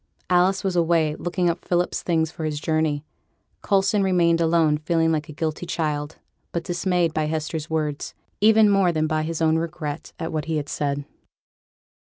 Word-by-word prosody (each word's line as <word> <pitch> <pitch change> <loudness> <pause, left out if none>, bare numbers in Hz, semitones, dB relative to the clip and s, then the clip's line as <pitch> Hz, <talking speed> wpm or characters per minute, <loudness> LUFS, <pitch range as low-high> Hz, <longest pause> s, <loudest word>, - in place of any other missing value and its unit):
Alice 185 +2 +3
was 190 -2 -1
away, 165 -2 +2
looking 175 0 -1
up 170 - -1
Philip's 175 0 0
things 160 -2 0
for 160 - -7
his 150 -1 -2
journey. 155 -1 0 0.6
Coulson 200 +1 +2
remained 170 -3 +3
alone, 160 -2 +3
feeling 165 +1 +1
like 155 -1 -2
a - - -6
guilty 155 +3 -3
child, 150 -3 -2 0.4
but 170 - -2
dismayed 175 -2 0
by 155 - 0
Hester's 155 0 -3
words, 150 -2 -2 0.2
even 220 +1 +6
more 195 -3 +4
than 155 -2 0
by 155 0 0
his 160 +1 -2
own 160 0 +3
regret 155 -3 -5
at 165 - -4
what 155 0 -2
he 160 -1 -1
had 145 -1 -4
said. 145 -1 -2
160 Hz, 175 wpm, -23 LUFS, 155-175 Hz, 0.6 s, even